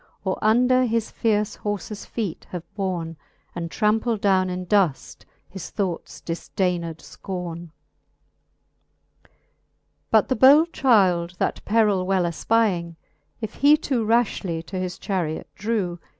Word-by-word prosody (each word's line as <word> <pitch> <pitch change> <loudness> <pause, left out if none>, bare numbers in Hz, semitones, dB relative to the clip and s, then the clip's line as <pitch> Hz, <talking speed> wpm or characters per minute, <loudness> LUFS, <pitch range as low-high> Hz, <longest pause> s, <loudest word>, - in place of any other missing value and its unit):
Or 190 -2 -2
under 250 +4 +4
his 230 -2 -1
fierce 210 -2 0
horfes 205 0 -5
feet 205 -8 -4
have 180 -2 -6
borne 175 -5 -3 0.4
And 170 -1 -4
trampled 220 +2 +1
downe 190 -2 +3
in 180 0 -4
duft 180 -7 0 0.2
his 190 -2 -8
thoughts 185 -4 -4
difdained 170 0 -2
fcorne. 175 -2 -7
XXXII. 155 - -40 0.8
But - - +4
the 260 - 0
bold 290 +8 +6
child 185 -9 +3
that - - -2
perill 205 -4 +2
well 190 -2 +2
efpying, 175 -1 0 0.5
If 220 -1 -4
he 290 +2 +5
too 265 -6 -1
rafhly 210 -7 0
to 190 +1 -5
his 180 -1 -4
charret 175 -6 -2
drew. 195 -5 -2
195 Hz, 125 wpm, -23 LUFS, 175-225 Hz, 0.8 s, bold